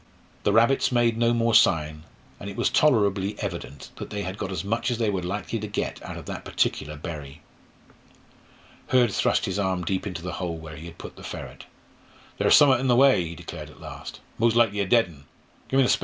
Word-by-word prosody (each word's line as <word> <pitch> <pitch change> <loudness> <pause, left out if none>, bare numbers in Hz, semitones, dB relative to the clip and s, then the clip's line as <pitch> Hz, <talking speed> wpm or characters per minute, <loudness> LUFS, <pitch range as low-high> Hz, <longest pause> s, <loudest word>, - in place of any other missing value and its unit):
The - - +1
rabbits 115 +7 +3
made 120 -2 +3
no 115 +1 +2
more 115 -1 +1
sign, 75 -3 +3 0.3
and 100 - -6
it 100 - -8
was - - +1
tolerably 105 -8 +2
evident 85 -8 -6
that - - -7
they 105 -1 -4
had 95 0 -4
got 100 -2 -5
as 90 -2 -3
much 115 +6 -1
as 120 - -1
they 110 -3 +1
were 95 -2 -2
likely 100 +5 -3
to 105 - -5
get 100 - -3
out - - -7
of - - -9
that - - -6
particular 75 +1 -1
"bury." 75 -3 -8 1.5
Hurd 125 -5 +3
thrust - - +1
his 95 +1 -2
arm 95 -2 0
deep 95 +1 -1
into 85 -3 -6
the 90 - -4
hole 85 -2 -3
where 80 -1 -9
he 80 +3 -9
had 85 0 -12
put - - -10
the - - -12
ferret. - - -8 0.7
"Ther's - - +5
summat 135 -4 +6
in 135 - -1
the 120 - +4
way," 130 -7 +5
he 85 - -7
declared - - -8
at - - -16
last. - - -9 0.2
"Mos' 115 0 +3
likely 110 -4 +3
a 100 - 0
dead 115 +2 +5 0.7
un. 135 -1 +4
100 Hz, 210 wpm, -25 LUFS, 90-115 Hz, 1.5 s, summat